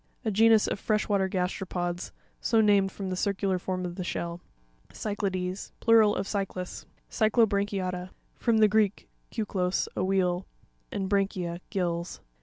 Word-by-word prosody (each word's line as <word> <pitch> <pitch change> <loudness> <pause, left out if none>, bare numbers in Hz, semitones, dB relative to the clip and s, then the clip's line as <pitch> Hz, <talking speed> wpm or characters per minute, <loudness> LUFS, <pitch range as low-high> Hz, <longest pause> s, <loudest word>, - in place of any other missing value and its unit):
A 220 - +1
genus 220 +1 +5
of - - -2
fresh 215 0 0
water 195 -2 +2
gasteropods, 180 -1 -2 0.3
so 225 - +2
named 200 -3 +4
from 195 -1 -5
the - - -1
circular 195 -1 0
form 185 0 -3
of 175 0 -6
the 185 - -2
shell. 170 -1 -4 0.5
Cy'ciapEes.—Plural 205 +2 +1
of - - -2
cyclas. 195 -3 -4 0.2
Cy'cLoprancui'aTa.—From 200 -1 0
the 215 -1 +6
Greek, 210 -1 +1 0.2
kuklos, 190 -5 -1
a - - 0
wheel, 185 -1 +1 0.4
and 195 -2 -2
bragcaia, 190 -3 0
gills. 175 -2 -2
195 Hz, 130 wpm, -28 LUFS, 180-210 Hz, 0.5 s, the